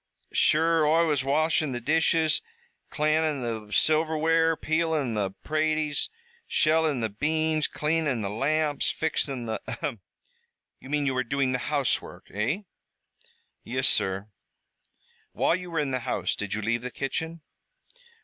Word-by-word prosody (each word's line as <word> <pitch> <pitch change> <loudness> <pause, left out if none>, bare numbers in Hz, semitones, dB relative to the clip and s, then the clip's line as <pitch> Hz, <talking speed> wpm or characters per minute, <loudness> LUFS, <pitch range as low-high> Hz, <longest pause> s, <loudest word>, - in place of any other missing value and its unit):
Sure 165 +1 +3
Oi 165 +2 +4
was 150 -4 +1
washin' 155 +1 +1
the 120 - -2
dishes, 160 +3 +2 0.5
cl'anin' 155 -1 +1
the 110 -3 -4
silverware, 160 +3 +3
peelin' 155 -6 0
the 105 -3 0
praties, 155 - -1 0.4
shellin' 155 -4 +2
the 110 - 0
beans, 155 +7 0
cleanin' 150 -6 0
the 100 - -2
lamps, 145 +5 0
fixin' 135 -5 -1
the 110 -2 -3
" - - -33
"Ahem! 140 -9 -4 0.8
You 130 - -12
mean 145 0 +1
you 135 - +1
were 130 0 0
doing 135 +1 0
the 125 - 0
housework, 145 -3 -1
eh?" 120 - -1 1.0
"Yis, 130 +2 0
sur." 95 +2 +1 1.0
"While - - +2
you 180 0 -6
were 165 - -4
in 145 -3 0
the 130 - 0
house, 125 +1 -1
did 105 -1 -3
you 110 - -3
leave 115 +2 0
the 125 - -4
kitchen?" 160 +6 -4
150 Hz, 140 wpm, -27 LUFS, 125-160 Hz, 1.0 s, Oi